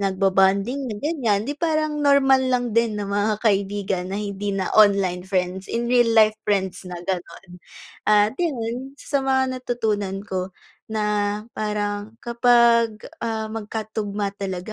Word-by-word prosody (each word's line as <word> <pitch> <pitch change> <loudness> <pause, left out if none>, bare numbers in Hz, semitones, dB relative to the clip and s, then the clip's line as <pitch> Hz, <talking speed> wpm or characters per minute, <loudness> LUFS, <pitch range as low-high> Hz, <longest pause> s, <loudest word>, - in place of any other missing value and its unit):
nagbobonding 195 +6 +1
na 215 - -4
ganiyan, 230 -7 0
di 280 - -2
parang 310 -1 -1
normal 280 -2 +5
lang 245 -2 0
din 230 -1 +1
na 205 - -3
mga 205 +1 0
kaibigan 200 -3 0
na 195 - -3
hindi 205 -1 -4
na 195 -2 -2
online 200 -4 +4
friends, 185 0 -2
in 235 +1 -2
real 240 -2 +5
life 215 -1 +6
friends 190 -3 -2
na 180 - -6
ganon, 180 -1 -6 0.5
ah, 210 0 +4
yun 265 -4 -3
isa 285 -1 -2
mga 265 -1 0
natutunan 205 -5 -2
ko 185 -2 -4 0.3
na 220 -1 -2 0.5
parang 210 0 -3
kapag, 235 -2 +4 0.2
ah, 220 -1 -2
magkatugma 210 -2 -4
talaga 190 +1 -4
215 Hz, 140 wpm, -23 LUFS, 195-240 Hz, 0.5 s, life